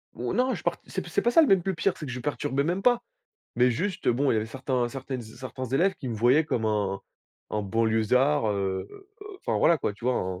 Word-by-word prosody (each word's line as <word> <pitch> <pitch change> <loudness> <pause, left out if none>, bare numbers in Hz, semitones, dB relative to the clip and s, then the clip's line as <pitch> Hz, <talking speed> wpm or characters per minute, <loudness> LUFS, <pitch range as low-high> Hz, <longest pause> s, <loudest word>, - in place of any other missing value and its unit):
Ou 120 +1 -3
non, 255 +2 +1
je - - -7
part - - 0
c'est - - -4
p - - -10
c'est - - 0
pas 240 - +3
ça 285 - +6
l 315 - +5
même 195 -5 +4
le 190 -1 -1
pire, 175 +3 +1
c'est 155 - -7
que - - -5
je 125 - -5
perturbais 135 +1 -1
même 180 +4 -1
pas. 245 -1 +3 0.5
Mais 125 +1 +4
juste, 180 - -2
bon, 135 +3 +2
il - - +2
y - - +2
avait 110 0 -1
certains 130 0 -1
certaines 130 0 -5
z 110 -2 -12
certains 130 0 -6
élèves 170 +10 +2
qui 130 - -7
me 115 - -3
voyaient 125 +8 +4
comme 120 -6 -1
un 105 -3 0 0.5
un 105 - -1
banlieusard, 115 +6 +2
heu, 95 -2 -2 0.5
enfin, - - -1
voilà, 170 - +5
quoi, 105 - -1
tu 105 - -14
vois 125 - +3
un 90 -3 -3
125 Hz, 255 wpm, -27 LUFS, 110-155 Hz, 0.5 s, ça